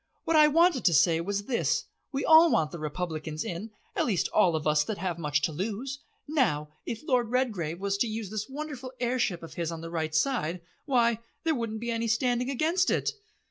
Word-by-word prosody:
What 330 - +1
I 305 -1 +8
wanted 330 -3 +3
to 170 - +5
say 165 +4 +4
was 200 +3 -2
this. 240 0 0 0.3
We 275 - -2
all 320 +1 +7
want 155 -2 +2
the 170 - -7
Republicans 155 0 -4
in, 180 +6 -5 0.3
at - - +1
least 195 -7 +1
all 180 -6 +3
of 155 - -3
us 150 -1 +3
that 215 +3 -4
have 175 -3 -3
much 150 -2 0
to - - +1
lose. 220 - -4 0.3
Now, 220 - +1 0.2
if 230 - -4
Lord 245 -4 +2
Redgrave 205 -11 -1
was 200 0 -1
to 240 - +2
use 215 -2 -5
this 215 +1 -4
wonderful 265 -3 -6
air 250 +1 0
ship 175 -7 0
of 165 - -9
his 170 -1 -3
on 165 -1 -6
the 165 0 -7
right 160 -2 -2
side 180 - 0 0.3
why 235 -4 +3 0.2
there 325 -1 +2
wouldn't 230 -4 -3
be 235 0 -2
any 230 0 -1
standing 245 +3 +1
against 325 +7 +1
it." - - +1
220 Hz, 215 wpm, -28 LUFS, 165-255 Hz, 0.3 s, I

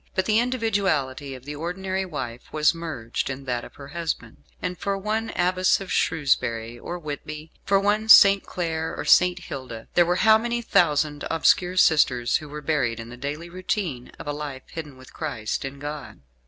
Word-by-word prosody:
But 190 - +1
the 215 +1 +3
individuality 195 - 0
of 130 0 -13
the 145 - -5
ordinary 190 +4 -3
wife 130 -9 -6
was 155 +2 +3
merged 155 -11 -4
in 135 +1 -5
that 120 -2 -2
of - - -12
her 140 -1 -11
husband, 155 -8 -4 0.2
and 180 0 -3
for 195 +2 -2
one 215 +3 -2
Abbess 185 +1 +2
of 195 -2 -7
Shrewsbury 120 -6 0
or 175 - -5
Whitby, 155 0 -7
for 195 0 +4
one 210 +2 +1
St. 200 -2 +9
Clare 160 -2 -3
or - - -4
St. 180 0 +5
Hilda, 130 -9 -8
there 175 -1 +4
were 175 - +2
how 220 0 +7
many 240 +1 -1
thousand 150 -7 +2
obscure 180 +3 +2
sisters, 125 -8 +4
who 155 -2 -10
were 150 +1 -7
buried 130 -7 0
in 115 +1 -8
the 120 - -9
daily 145 +6 -5
routine 175 - -3
of - - -9
a 145 - -2
life 145 -3 -6
hidden 150 -5 -7
with 130 0 -15
Christ 140 -9 -3
in 135 +1 -6
God! 145 0 -7
155 Hz, 185 wpm, -24 LUFS, 135-185 Hz, 0.2 s, St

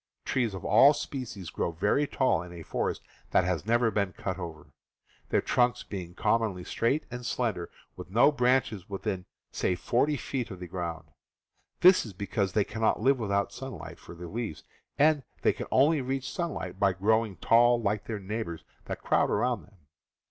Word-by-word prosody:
Trees 120 -6 0
of 95 - -7
all 135 +8 +7
species 115 - -6
grow - - -1
very 105 - +1
tall 130 -13 +1
in 90 0 -9
a 85 -2 -9
forest - - -2 0.3
that - - +3
has 90 +1 -2
never 120 0 +3
been 100 -3 0
cut 95 -1 -4
over, 80 -4 -8 0.6
their - - +2
trunks 120 0 +2
being 90 -3 -7
commonly, 110 -6 +1
^ - - -13
straight 135 +7 0
and 120 +1 -6
slender, 110 -8 -2 0.3
with - - -9
no 120 +9 +5
branches 125 -7 +1
within, 95 -1 -3 0.3
say, 90 - 0
forty 135 +10 +1
feet 125 -1 -3
of 95 -4 -8
the 90 - -6
ground. 85 -3 -5 0.7
This 185 +1 +7
is 110 - -9
because 100 +1 -2
they 105 - +3
cannot 110 +2 0
live 130 +4 +3
without 100 -2 0
sunlight 135 -1 -8
for - - -11
their 85 +1 -8
leaves, 105 -2 -5 0.3
and 150 +1 +4 0.2
they - - +4
can - - -6
only 145 +3 +4
reach 130 0 -2
sunlight 95 - -4
by 100 -2 +3
grow 110 +5 +3
ing 105 -4 -7
tall 120 +6 +4
like 105 -1 -1
their 110 -2 -4
neighbors 100 -4 -4 0.2
that - - -6
crowd - - +2
around 120 0 +1
them. 95 -7 -25
105 Hz, 185 wpm, -29 LUFS, 95-125 Hz, 0.7 s, all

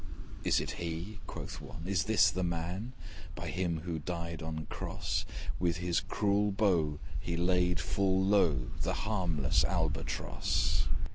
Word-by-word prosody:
'Is - - +4
it - - -2
he?' 85 +5 -4
quoth - - -6
one, 80 - -8
'Is 95 -3 +1
this 90 -6 +5
the 95 - -2
man? 90 +7 -2 0.4
By - - -4
him 85 -3 0
who 80 -1 -3
died 85 +1 -4
on 80 -1 -4
cross, - - -2 0.3
With 85 -2 +2
his 85 -1 +1
cruel 105 0 +1
bow 90 -8 +2 0.2
he 85 -1 -2
laid 90 0 +3
full 95 -1 +2
low 80 -11 +3
The - - +1
harmless 90 -10 +2
Albatross. 60 - 0
90 Hz, 140 wpm, -32 LUFS, 80-95 Hz, 0.4 s, this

